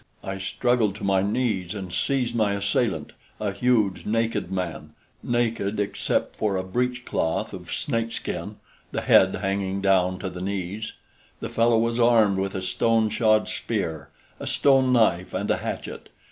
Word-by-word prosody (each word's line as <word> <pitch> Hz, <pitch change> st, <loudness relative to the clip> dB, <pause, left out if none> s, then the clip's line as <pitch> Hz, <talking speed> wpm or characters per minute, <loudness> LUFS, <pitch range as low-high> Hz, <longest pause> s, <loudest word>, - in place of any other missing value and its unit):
I 95 Hz, 0 st, -4 dB
struggled 110 Hz, +1 st, +1 dB
to 105 Hz, -, -9 dB
my 95 Hz, -1 st, +3 dB
knees 100 Hz, -4 st, -1 dB
and 95 Hz, -4 st, -6 dB
seized 125 Hz, +6 st, 0 dB
my 110 Hz, -3 st, +2 dB
assailant, 100 Hz, +1 st, 0 dB, 0.3 s
a 105 Hz, -2 st, -1 dB
huge, 105 Hz, -2 st, +1 dB
naked 115 Hz, -3 st, -1 dB
man 85 Hz, -5 st, -4 dB, 0.3 s
naked 115 Hz, -4 st, -1 dB
except 105 Hz, -, -1 dB
for 100 Hz, -3 st, 0 dB
a 95 Hz, -, -2 dB
breechcloth 120 Hz, -3 st, -1 dB
of 90 Hz, -2 st, -8 dB
snakeskin, 115 Hz, -4 st, -3 dB, 0.4 s
the -, -, -2 dB
head 95 Hz, 0 st, +5 dB
hanging 95 Hz, 0 st, -1 dB
down 95 Hz, -2 st, +2 dB
to 95 Hz, 0 st, -4 dB
the 90 Hz, 0 st, -7 dB
knees. 100 Hz, +2 st, -4 dB, 0.5 s
The -, -, -5 dB
fellow 115 Hz, 0 st, +3 dB
was 115 Hz, +1 st, +1 dB
armed 110 Hz, -5 st, +4 dB
with 95 Hz, 0 st, -2 dB
a 95 Hz, -, -3 dB
stone 110 Hz, +3 st, +2 dB
shod 110 Hz, -1 st, +3 dB
spear, 80 Hz, -10 st, -3 dB, 0.3 s
a -, -, -6 dB
stone 135 Hz, -2 st, +4 dB
knife 100 Hz, -7 st, +2 dB
and -, -, -1 dB
a -, -, +2 dB
hatchet. -, -, -6 dB
100 Hz, 155 wpm, -25 LUFS, 95-115 Hz, 0.5 s, head